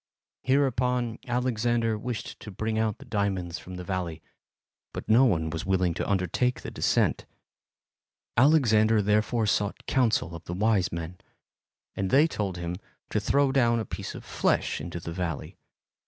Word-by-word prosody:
Hereupon, 125 -3 +1
Alexander 120 -2 +1
wished 115 0 -5
to - - -9
bring 110 +3 -2
out 110 -2 0
the - - -13
diamonds 95 -5 -2
from 90 - -9
the 90 - -6
valley, 90 -4 -4 0.7
but - - -6
no 115 +5 +6
one 80 -9 +1
was 80 0 -3
willing 95 -2 +1
to - - -3
undertake 100 +6 0
the - - -6
descent. - - +1 1.1
Alexander 115 -6 +4
therefore 105 +3 +2
sought 105 -1 -1
counsel 115 -10 +1
of 85 0 -8
the 85 - -4
wise 100 -2 +2
men, 85 +2 -6 0.8
and 95 -1 -1
they 145 +7 +6
told 100 - -2
him 85 0 -4 0.3
to 105 - +1
throw 140 +6 +2
down 120 -3 +3
a 110 - -3
piece - - -6
of - - -9
flesh - - 0
into 85 +2 -5
the 85 0 -6
valley. 85 -4 -4
105 Hz, 155 wpm, -27 LUFS, 90-120 Hz, 1.1 s, no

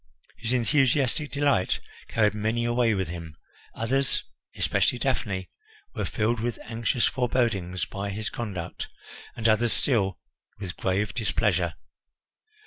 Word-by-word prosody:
His 115 +1 -2
enthusiastic 135 +3 +3
delight 140 -9 +2 0.3
carried 105 -2 +2
many 110 +3 0
away 120 -2 +3
with 95 -2 -1
him; 85 -2 -7 0.4
others, 135 +4 +1 0.3
especially - - +2
Daphne, 100 -8 -1 0.4
were - - -2
filled 110 +2 0
with 120 +1 -2
anxious 115 +1 0
forebodings 115 - +1
by 100 +6 -4
his 110 +3 -3
conduct, 95 -8 -4 0.5
and 115 - +1
others 110 +1 +4
still 100 -9 +3 0.4
with 95 -5 -5
grave 95 +2 0
displeasure. 110 -3 +1
115 Hz, 120 wpm, -27 LUFS, 100-120 Hz, 0.5 s, others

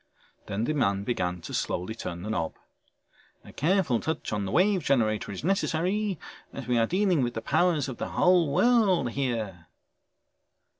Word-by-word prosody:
Then 100 +3 -2
the 155 - 0
man 100 -9 +1
began 90 -6 -2
to - - -8
slowly 90 +5 -2
turn 85 -6 -6
the 105 - -4
knob. 85 -7 -2 0.9
"A - - -13
careful 160 - +1
touch 160 -7 -3
on 105 -1 -1
the 95 - -4
Wave 190 0 +3
Generator 110 -8 +1
is 95 - -7
necessary 195 +2 0 0.3
as 135 - -7
we 120 0 +1
are 115 - +3
dealing 185 -4 +2
with 120 -2 -1
the 115 - -3
powers 170 -6 +2
of 130 - -6
the - - -4
whole 180 -4 +3
world 195 - +3
here...." 110 - -3
135 Hz, 165 wpm, -27 LUFS, 110-180 Hz, 0.9 s, Wave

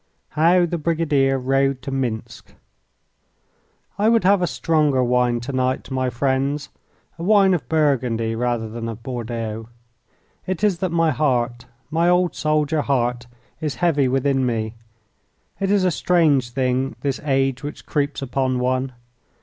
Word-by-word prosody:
VI. 150 - -2
How 175 +2 +5
the 170 0 -3
Brigadier 150 -4 +1
Rode 135 +1 +1
to 135 - -5
Minsk 125 -5 -4 1.4
I 215 +2 +4
would 230 -4 +3
have 195 +1 +4
a 175 - +1
stronger 150 -6 +1
wine 125 -1 +2
to 125 +4 -5
night, 130 0 -1
my 130 -1 0
friends, 135 +3 -1 0.5
a - - -5
wine 195 -1 +5
of 175 - -3
Burgundy 125 -8 +1
rather 120 -1 -1
than 115 +1 -5
of 115 0 -8
Bordeaux. 115 -3 -5 0.8
It 185 +2 -3
is 195 -5 +2
that 185 - -1
my 165 -1 +2
heart, 125 -5 0 0.3
my 165 +2 +2
old 180 0 +2
soldier 155 0 +1
heart, 120 -3 -1 0.3
is 150 -4 -3
heavy 155 -6 +2
within 135 +1 +1
me. 110 -3 -1 0.9
It 195 - 0
is 200 -1 +3
a 185 - +3
strange 155 -8 +2
thing, 130 +1 -1
this 140 -2 -1
age 135 -2 0
which 145 +1 -7
creeps 145 -2 -2
upon 130 0 -1
one. 130 +1 -1
135 Hz, 150 wpm, -21 LUFS, 125-160 Hz, 1.4 s, How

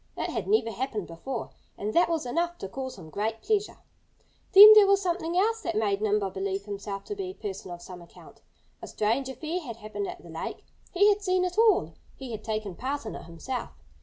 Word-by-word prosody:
It - - -2
had - - -3
never 405 - +2
happened 225 -3 -3
before. 225 +9 -6 0.3
And 210 +2 -3
that 345 - +4
was 325 -5 -1
enough 340 +7 -1
to 195 - -6
cause 260 +4 -6
him 160 -4 -12
great 220 +4 -3
pleasure. 420 0 0 0.7
Then 410 +2 +12
there 420 -2 +8
was 395 0 +4
something 350 -2 -2
else 450 +4 +2
that 225 - -3
made 205 -2 0
Nimble 210 -2 +1
believe 195 +1 -3
himself 200 -1 -5
to 415 - -6
be 390 -1 -4
a - - -7
person 195 -3 -6
of 175 0 -8
some 180 -1 -10
account: 170 - -16 0.4
A - - -7
strange 235 +6 0
affair 315 +6 -4
had 240 -8 -7
happened 225 - -5
at 360 0 -8
the - - -13
lake. - - -6 0.3
He 400 +3 +4
had 415 0 +2
seen 370 -2 +1
it 360 -1 -3
all. 405 - +4 0.2
He 265 -3 -8
had 215 -1 -6
taken 215 -3 -3
part 270 +7 -4
in 220 - -5
it - - -8
himself. 230 +10 -6
250 Hz, 220 wpm, -27 LUFS, -, 0.7 s, Then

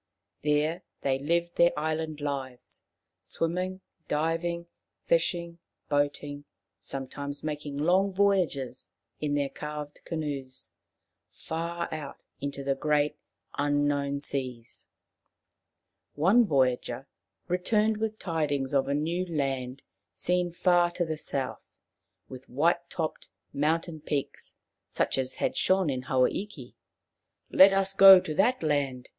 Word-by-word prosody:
There 150 +4 +1 0.2
they 135 -1 +1
lived 170 +4 0
their 170 -2 +4
island 155 0 -2
lives, 135 -4 -5 0.4
swimming, 180 +3 -2 0.3
diving, 165 +3 -1 0.4
fishing, 170 0 0 0.3
boating; 145 0 -1 0.3
sometimes 140 +1 -6
making 150 -2 -4
long 185 +6 +3
voyages 185 -10 0 0.3
in 145 -1 -1
their 140 -1 0
carved 150 -1 -7
canoes 145 -5 -5 0.6
far 170 +1 -4
out 150 -3 -7 0.2
into 140 0 -4
the 135 0 +1
great 150 +1 +1 0.4
unknown 145 -1 +1
seas. 125 -5 -5 1.3
One 200 +10 +4
voyager 130 -5 +1 0.4
returned 210 +4 +1
with 220 0 -2
tidings 145 -7 -1
of 135 -1 +2
a 140 - 0
new 165 +5 0
land 135 -4 -2 0.3
seen 180 0 0
far 175 0 +3
to 175 0 0
the 160 -1 -2
south, 135 -3 -4 0.6
with 130 0 -11
white 170 +6 +1
topped 160 -2 -4 0.2
mountain 160 +3 0
peaks 145 -2 -4 0.3
such - - 0
as 130 0 -2
had - - -1
shone 185 -5 +2
in 130 -1 -2
Hawa 130 0 +2
iki. 165 -11 -6 0.4
" - - -42
Let 195 +1 +8
us 195 0 +1
go 195 -1 +10
to 155 - -4
that 245 +6 +2
land. 140 -5 0
150 Hz, 120 wpm, -28 LUFS, 140-170 Hz, 1.3 s, go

